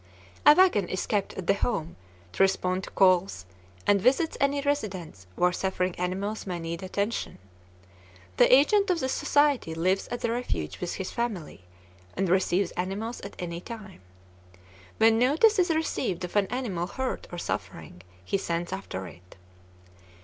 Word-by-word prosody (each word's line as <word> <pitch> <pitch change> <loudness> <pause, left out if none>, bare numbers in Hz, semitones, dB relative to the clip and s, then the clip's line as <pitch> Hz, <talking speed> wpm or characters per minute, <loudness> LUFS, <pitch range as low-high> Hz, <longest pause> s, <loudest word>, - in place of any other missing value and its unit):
A 295 - +10
wagon 350 - +4
is 185 - -2
kept 205 -3 -1
at 190 - -6
the 195 - +4
home 170 -6 -2 0.4
to - - -2
respond 185 -1 +2
to - - -10
calls, 185 - +2 0.4
and 200 -1 +4
visits 275 - +2
any 280 +1 +2
residence 190 - -3
where 180 0 +3
suffering 185 0 -1
animals 195 +4 -3
may 180 -2 -3
need 165 0 -5
attention. 200 +4 -3 1.0
The - - +5
agent 385 +10 +5
of 355 -2 +2
the 260 - -1
society 285 - +1
lives 185 +4 0
at 240 0 -5
the 230 - 0
refuge 230 - -3
with 180 - -3
his 190 - -5
family, 195 - -4 0.5
and 195 - +1
receives 185 0 +2
animals 200 +6 -4
at 200 - -9
any 170 -1 -5
time. 210 - -10 1.0
When 225 0 +5
notice 325 - +4
is 360 0 +3
received 270 - -1
of 180 - -6
an 205 -2 +3
animal 205 -9 -3
hurt 260 +5 -4
or 175 - -6
suffering, 90 - -5 0.2
he 195 - 0
sends 170 0 -3
after 95 - -5
it. 90 +1 -14
195 Hz, 155 wpm, -27 LUFS, 180-245 Hz, 1.0 s, A